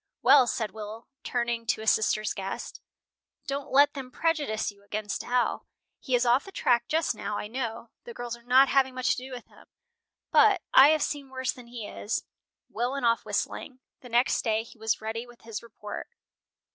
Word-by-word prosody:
"Well," 265 -1 +7
said 220 -2 -2
Will, 220 +1 -8
turning 235 -2 -2
to 220 - 0
his 220 - +4
sister's 215 -2 +1
guest, 195 0 -6 0.6
"don't 275 0 -4
let 285 +2 +5
them 270 -3 -7
prejudice 290 -9 -1
you 200 0 -22
against 205 0 -4
Al. 245 0 0 0.3
He 260 -4 0
is 245 - +2
off 245 +3 +4
the 390 - -10
track 240 -8 +2
just 320 -3 +1
now, 210 -1 -4
I - - -4
know. 230 -1 -5
The 235 - -9
girls 240 -1 -5
are 235 - -17
not 255 +3 +5
having 265 -2 +2
much 255 -1 +1
to - - +1
do 260 - -8
with 245 -2 -7
him, - - -20 0.6
but 415 -5 +5
I 265 - +9
have 310 -1 +3
seen 285 -2 -4
worse 260 -1 -2
than 250 -2 -13
he 235 -3 -7
is." 210 - -3 0.4
Will 245 +3 -2
went 275 -3 -2
off 230 0 +2
whistling. 260 -2 -3 0.2
The 250 - -12
next 240 +2 +2
day 220 -1 +1
he 230 0 -16
was 220 0 0
ready 225 +2 -4
with 240 -1 -17
his 225 -2 -6
report. 210 -2 -8
240 Hz, 195 wpm, -28 LUFS, 220-265 Hz, 0.6 s, I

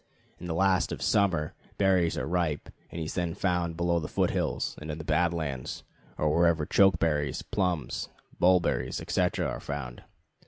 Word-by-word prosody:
In 90 - -7
the 80 - -2
last 95 +1 +2
of - - -4
summer, 90 -7 +1 0.2
berries 95 -4 +3
are - - -1
ripe, 85 -3 -1 0.2
and - - -8
he 80 - -3
is 80 - -5
then 85 -2 -2
found 90 -4 0
below 85 0 +1
the 75 - -4
foot - - +1
hills, - - -1
and 75 - -7
in 75 - -3
the 80 - -6
Bad 85 +3 +2
Lands, 70 -7 -4 0.3
or 75 0 +1
wherever 85 -2 +3
chokeberries, 80 -7 +2
plums, 90 -8 -1 0.3
bulberries, 90 -1 +2
etc., - - 0
are - - -4
found. 70 -5 -6
85 Hz, 170 wpm, -28 LUFS, 75-90 Hz, 0.3 s, berries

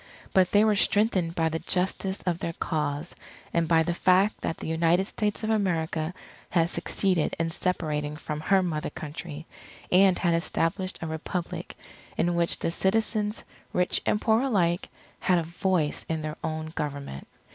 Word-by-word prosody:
But 185 -2 +5
they 205 +1 +5
were 215 -1 +4
strengthened 195 -5 +2
by 160 -1 +2
the 160 +1 -2
justice 190 +2 -1
of 175 -2 0
their 165 - -3
cause, 150 0 -2 0.4
and 170 -1 +2
by 165 0 +4
the 175 +1 -1
fact 185 +4 +3
that 165 - -2
the - - -6
United 165 +3 +2
States 210 +1 -2
of 220 - 0
America 170 -5 0 0.3
had 170 -1 +2
succeeded 185 -6 0
in 165 0 0
separating 150 -4 -1
from 150 0 -5
her 190 +3 +3
Mother 165 -2 -2
Country, 155 0 -7 0.5
and 185 0 +6
had 175 -2 +2
established 170 +2 0
a - - -2
Republic 160 +2 -4 0.4
in 175 +1 +2
which 170 0 +1
the - - -1
citizens, 210 +3 0 0.3
rich 180 0 +2
and 210 - +1
poor 220 +1 +3
alike, 185 -9 +1 0.3
had 180 - +3
a 170 - +1
voice 170 -1 0
in 160 -1 -1
their 155 0 -4
own 155 0 -3
government. 140 - -5
170 Hz, 165 wpm, -27 LUFS, 160-190 Hz, 0.5 s, and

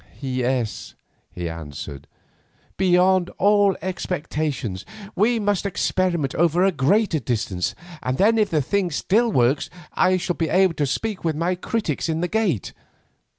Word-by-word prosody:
"Yes," 125 -4 -2 0.4
he 90 -1 -5
answered, 75 -4 -7 0.7
"beyond 185 0 +3
all 205 -1 +4
expectations. 150 - -3 0.3
We 225 +5 +2
must 205 -2 0
experiment 180 -6 0
over 170 +2 +2
a 195 - +4
greater 175 +4 +2
distance, 105 -7 -2 0.3
and 130 +1 -2
then 225 +3 +4
if 210 - +2
the 155 -3 +1
thing 195 +4 0
still 220 +9 +1
works 130 - +2 0.2
I 185 0 +3
shall 175 -1 -2
be 165 - 0
able 185 -2 +4
to 145 -3 -1
speak 210 +8 -3
with 160 -2 0
my 170 +4 0
critics 180 - -2
in 160 0 -1
the 175 - 0
gate. 200 - -1
175 Hz, 145 wpm, -23 LUFS, 135-195 Hz, 0.7 s, all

